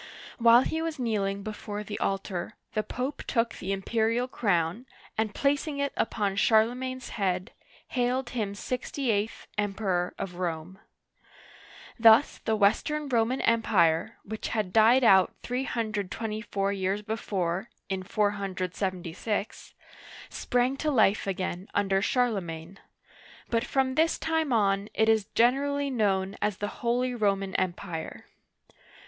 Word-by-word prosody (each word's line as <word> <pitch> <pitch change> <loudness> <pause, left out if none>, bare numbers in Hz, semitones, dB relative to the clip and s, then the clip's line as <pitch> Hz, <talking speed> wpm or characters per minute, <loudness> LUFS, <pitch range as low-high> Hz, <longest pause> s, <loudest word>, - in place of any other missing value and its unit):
While 235 +1 +7
he 320 +3 -2
was 325 -1 -3
kneeling 200 -5 -1
before 210 0 -5
the 210 0 -6
altar, 195 0 -2 0.2
the 215 - +1
Pope 255 +6 -4
took 230 -1 +1
the 190 - -5
imperial 225 +5 0
crown, 200 0 0 0.3
and 215 -1 -1
placing 285 +1 0
it 280 0 -1
upon 200 -3 -1
Charlemagne's 250 +4 +2
head, 185 -1 -1 0.4
hailed 250 0 0
him 210 -5 -2
sixty 255 +3 -2
eighth 210 +1 -2
Emperor 195 -3 -1
of 180 -2 -5
Rome. 175 +1 -4 1.2
Thus 225 +4 +6
the 220 - 0
Western 285 +9 +1
Roman 240 +1 +1
Empire, 190 -8 +2
which 220 +1 -5
had 210 -5 -2
died 230 +4 +6
out 190 -5 +5
324 215 -4 -2
years 195 +1 -1
before 200 -2 -2 0.2
(in 190 -1 -2
476), 190 0 -2 0.5
sprang 250 +2 0
to 305 - -1
life 215 -7 +3
again 185 -1 -3
under 195 -1 +2
Charlemagne; 195 -7 -1 0.7
but 230 -1 +2
from 265 -1 0
this 320 +4 +2
time 320 -3 0
on 200 -2 +2
it 220 - +3
is 220 -2 +3
generally 280 +4 +2
known 200 -5 0
as 210 -3 0
the 205 - -2
" - - -11
Holy 245 +1 +1
Roman 195 -4 0
Empire." 175 -2 -3
215 Hz, 125 wpm, -28 LUFS, 195-245 Hz, 1.2 s, While